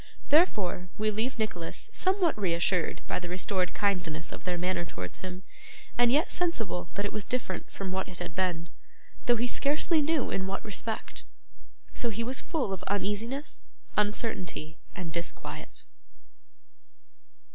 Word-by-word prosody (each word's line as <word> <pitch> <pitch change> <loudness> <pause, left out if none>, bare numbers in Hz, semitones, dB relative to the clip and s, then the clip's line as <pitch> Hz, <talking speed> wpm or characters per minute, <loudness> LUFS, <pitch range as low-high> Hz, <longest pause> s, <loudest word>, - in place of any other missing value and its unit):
Therefore, 205 - +4
we 215 0 +2
leave 225 +6 0
Nicholas 215 - -2
somewhat 375 -3 +3
reassured 175 -3 +2
by - - 0
the 175 -1 -6
restored 180 0 +1
kindness 180 -5 0
of - - -8
their 180 -1 0
manner 180 0 +1
towards 90 - -6
him, 185 0 -6 0.5
and 240 0 +5
yet 300 +5 +4
sensible 225 - 0
that 200 - 0
it 205 - -2
was 215 - 0
different 235 -7 -2
from 195 -2 -4
what 190 0 -1
it 185 - -9
had - - -4
been 175 -3 0 0.6
(though 240 - +7
he 235 +1 +1
scarcely 300 +5 +3
knew 300 -2 +2
in 190 0 0
what 195 +1 -3
respect): 220 +1 -3 0.7
so 240 - 0
he 230 +1 -1
was 255 +3 0
full 285 - 0
of 185 - -4
uneasiness, 210 +8 -1 0.2
uncertainty, 205 -7 0 0.2
and 170 -3 -4
disquiet. 170 0 -3
200 Hz, 145 wpm, -30 LUFS, 180-240 Hz, 0.7 s, though